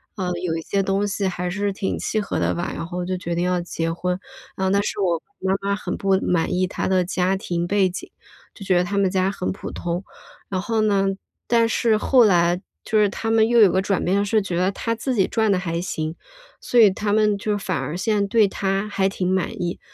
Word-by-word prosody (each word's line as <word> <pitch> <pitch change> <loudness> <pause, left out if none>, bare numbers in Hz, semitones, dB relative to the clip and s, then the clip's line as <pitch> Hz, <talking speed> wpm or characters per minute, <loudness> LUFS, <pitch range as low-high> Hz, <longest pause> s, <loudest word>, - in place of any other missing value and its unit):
呃， 185 -3 -2
有 165 -2 -1
一 - - -4
些 195 +4 -1
东 195 +1 0
西 200 -1 -1
还 180 -1 -3
是 205 +2 -1
挺 195 0 -2
契 215 - -1
合 - - -3
的 - - +1
吧， 175 - -3
然 - - -4
后 180 +1 -4
就 185 0 -2
决 175 -1 -4
定 175 - 0
要 180 0 +1
结 165 -1 -3
婚。 180 +2 -2 0.4
呃， 190 0 0
但 200 0 +2
是 205 - -3
我 170 -4 +1 0.2
妈 190 0 0
妈 200 0 0
很 210 - -4
不 195 -1 +2
满 180 +1 0
意 185 +1 +1
他 - - -3
的 185 -1 +2
家 185 +1 0
庭 175 -2 -2
背 195 0 +2
景， 180 - -8 0.4
就 200 - -11
觉 185 -2 +3
得 175 - +3
他 200 +3 -3
们 195 -2 +3
家 190 +1 +1
很 185 - -3
普 190 - -7
通， 175 +2 -3 0.5
然 185 -2 -1
后 220 +2 0
呢， 200 -2 +2 0.4
但 230 -1 +3
是 225 -1 +2
后 250 +3 +4
来 175 -2 +3 0.2
就 220 - +1
是 205 -1 +4
他 225 +2 -3
们 225 -1 +4
又 240 -1 +4
有 205 - +8
个 190 - +2
转 195 -1 -1
变 195 +3 +2
是 215 +1 +2
觉 185 -3 -4
得 185 +2 +2
他 230 +3 -2
自 255 +3 -2
己 195 - +3
赚 220 -2 +1
得 195 - +3
还 170 -2 -2
行， 160 -2 -3 0.5
所 245 - +2
以 215 -3 +8
他 205 +2 -2
们 210 -1 +3
就 205 +1 -1
反 190 -5 -2
而 150 +5 -4
现 205 0 +1
对 220 -1 +4
他 195 +1 -1
还 195 -1 +1
挺 185 -2 -2
满 190 -1 0
意。 175 0 -3
195 Hz, 260 characters per minute, -22 LUFS, 180-205 Hz, 0.5 s, 有